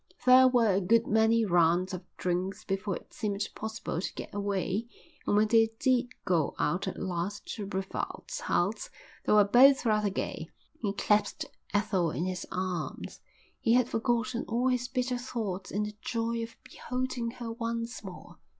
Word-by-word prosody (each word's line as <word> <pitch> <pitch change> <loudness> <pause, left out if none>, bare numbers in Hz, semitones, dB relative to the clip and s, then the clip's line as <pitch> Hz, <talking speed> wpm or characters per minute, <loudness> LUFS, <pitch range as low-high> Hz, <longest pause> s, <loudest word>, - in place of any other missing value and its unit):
There 255 0 +8
were 235 -5 +4
a 195 - +2
good 230 +5 +3
many 220 +1 +3
rounds 175 +1 +3
of 180 - -4 0.2
drinks 185 +3 -2
before 195 0 -2
it - - -11
seemed 205 -2 -2
possible 220 -6 -4
to - - -4
get - - -7
away 200 +2 -1 0.4
and - - +3
when 215 +1 +4
they 225 0 +5
did 250 -1 +2 0.2
go 175 -6 +1
out 175 +6 0
at 190 - -4
last 180 +2 -3
to 205 -3 -5
Brevald's 195 - -4
house - - 0 0.4
they - - +4
were 210 -1 +7
both 260 +6 +6
rather 210 -2 +2
gay. 195 - -4 0.3
He 205 -3 -1
clasped 210 +1 +1 0.3
Ethel 205 -4 +1
in 165 +3 -2
his 185 -1 -4
arms. 180 -3 -4 0.4
He 230 - +2
had 245 -1 +4
forgotten 240 +1 0
all 240 +3 +1
his 250 -1 0
bitter 250 -1 -1
thoughts 215 -7 -4
in 205 +2 -1
the 210 0 -4
joy 230 -1 -1
of 230 0 -6
beholding 250 -2 -3
her 235 -2 -5
once 230 0 -4
more. 190 -3 -10
215 Hz, 170 wpm, -29 LUFS, 190-235 Hz, 0.4 s, There